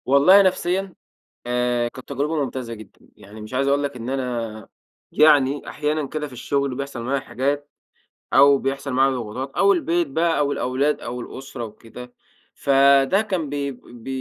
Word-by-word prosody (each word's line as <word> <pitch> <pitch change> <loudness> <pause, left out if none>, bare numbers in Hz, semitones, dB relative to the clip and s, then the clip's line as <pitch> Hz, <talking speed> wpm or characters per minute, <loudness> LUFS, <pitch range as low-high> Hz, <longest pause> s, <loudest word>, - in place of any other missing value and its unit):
والله 145 +9 +6
نفسيًا، 185 0 0 0.5
آآ، 120 -1 0
كانت 130 +2 -11
تجربة 145 +2 -1
ممتازة 130 -3 -5
جدًا، 110 -2 -13 0.2
يعني 105 +2 -13
مش 110 +4 -10
عايز 135 +2 0
أقول 140 +1 +2
لك 140 -1 -3
إن 120 0 -6
أنا 120 -5 -4 0.4
يعني 145 -2 +4
أحيانًا 150 0 -2
كده 150 +1 -4
في 135 - -14
الشغل 140 +2 -2
بيحصل 140 -2 -5
معايا 135 +3 0
حاجات، 140 +2 -2 0.6
أو 140 0 +6
بيحصل 135 +1 -3
معايا 135 +2 +3
ضغوطات 125 +3 -5
أو 200 0 +5
البيت 170 -1 0
بقى 165 +4 0
أو 145 -1 +1
الأولاد 135 +4 0
أو 125 +1 -6
الأسرة 130 0 -7
وكده. 115 +3 -11 0.4
فده 140 +6 +4
كان 185 -8 -3
ب - - -4 0.3
ب 120 -2 -14
135 Hz, 160 wpm, -22 LUFS, 125-145 Hz, 0.6 s, والله